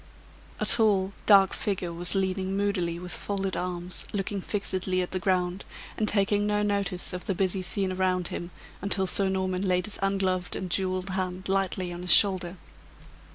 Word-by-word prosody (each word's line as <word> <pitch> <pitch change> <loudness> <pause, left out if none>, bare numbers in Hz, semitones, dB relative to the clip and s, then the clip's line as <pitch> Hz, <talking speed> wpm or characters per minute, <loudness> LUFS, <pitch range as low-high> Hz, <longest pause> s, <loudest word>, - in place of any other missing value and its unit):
A - - 0
tall, 200 -4 +4
dark 195 -2 +6
figure 185 -4 -3
was 175 +3 +4
leaning 190 0 -1
moodily 190 -4 -1
with 180 0 -5
folded 195 -2 -2
arms, 180 0 -3
looking 200 0 -3
fixedly 185 -2 -1
at 180 - -7
the 185 - -1
ground, 185 0 0 0.3
and 215 - -1
taking 205 0 +2
no 210 0 +1
notice 200 -3 -1
of 180 - -6
the 195 - 0
busy 190 +1 +1
scene 190 +1 -1
around 185 -1 0
him 175 - -5 0.3
until 195 0 +1
Sir 190 +1 +1
Norman 185 -1 -1
laid 180 -1 +1
his 210 - -6
ungloved 190 -2 0
and 185 -2 -5
jeweled 185 0 -1
hand 185 0 -3
lightly 190 -2 -1
on 175 - -7
his 180 - 0
shoulder. 185 -3 +3
190 Hz, 170 wpm, -27 LUFS, 180-195 Hz, 0.3 s, dark